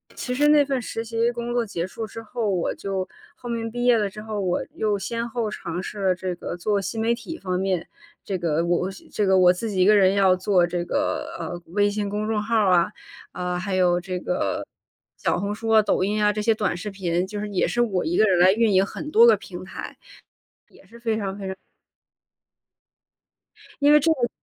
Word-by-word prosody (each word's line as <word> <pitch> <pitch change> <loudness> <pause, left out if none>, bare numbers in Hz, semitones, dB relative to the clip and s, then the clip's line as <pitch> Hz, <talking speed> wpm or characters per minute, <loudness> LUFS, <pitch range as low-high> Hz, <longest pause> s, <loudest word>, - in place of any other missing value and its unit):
其 250 - -4
实 295 +2 +3
那 300 -1 +6
份 270 -2 -1
实 225 0 -4
习 230 +1 0
工 240 0 -5
作 240 -1 +1
结 180 -4 -3
束 220 +4 -6
之 225 +2 -8
后， 225 -1 -3
我 180 -3 0
就 190 -1 -3 0.3
后 245 - -9
面 230 -1 -2
毕 245 +1 -3
业 245 -2 +5
了 210 -2 +1
之 210 +2 -9
后， 215 -1 -4
我 185 -3 0
又 210 -2 0
先 230 +4 -3
后 230 -2 -2
尝 175 -3 -5
试 210 - -7
了 190 -1 +2
这 180 0 -4
个 175 - -6
做 200 +3 0
新 220 +3 -3
媒 230 +1 +2
体 330 +7 -8
方 185 -1 -2
面。 190 -3 -1 0.4
这 195 -2 -3
个 165 -2 0
我 175 0 +2
我 190 +2 -2
是 190 - -14
这 210 - 0
个， 190 -1 +4
我 180 -1 +7
自 215 +5 -3
己 185 -2 0
一 - - +5
个 210 +1 +6
人 190 -1 +5
要 195 -2 +4
做 185 -1 +2
这 175 0 -2
个， 300 - -2
呃， 175 -1 -5
微 205 0 +3
信 205 0 -2
公 210 +1 -2
众 220 -1 0
号 225 +2 -1
儿 205 -4 +4
啊， 170 -1 +3 0.4
啊， 180 0 -3
还 190 +1 -3
有 180 -1 +3
这 180 0 -4
个， 280 +9 -2 0.5
小 - - 0
红 200 +1 -2
书 225 +1 -5
啊、 220 -1 +6
抖 200 - +1
音 210 +2 0
啊， 210 - +4
这 210 0 -3
些 225 +1 +3
短 210 -5 -1
视 210 +4 -5
频， 180 -2 -1
就 205 +1 -5
是， 210 0 -4
也 195 - +1
是 240 - 0
我 190 -8 0
一 170 - -1
个 215 - +5
人 190 -4 +3
来 185 +2 +6
运 225 0 +2
营 190 +1 +4
很 300 - -7
多 460 +2 +7
个 470 - +7
平 - - -9
台， - - -8 0.7
也 - - -20
是 235 - -15
非 225 -2 0
常 195 -1 -3
非 195 - -6
常 190 - -5 2.3
因 290 +1 +6
为 300 - +7
这 325 +3 +2
个 240 -6 -1
205 Hz, 255 characters per minute, -24 LUFS, 185-230 Hz, 2.3 s, 我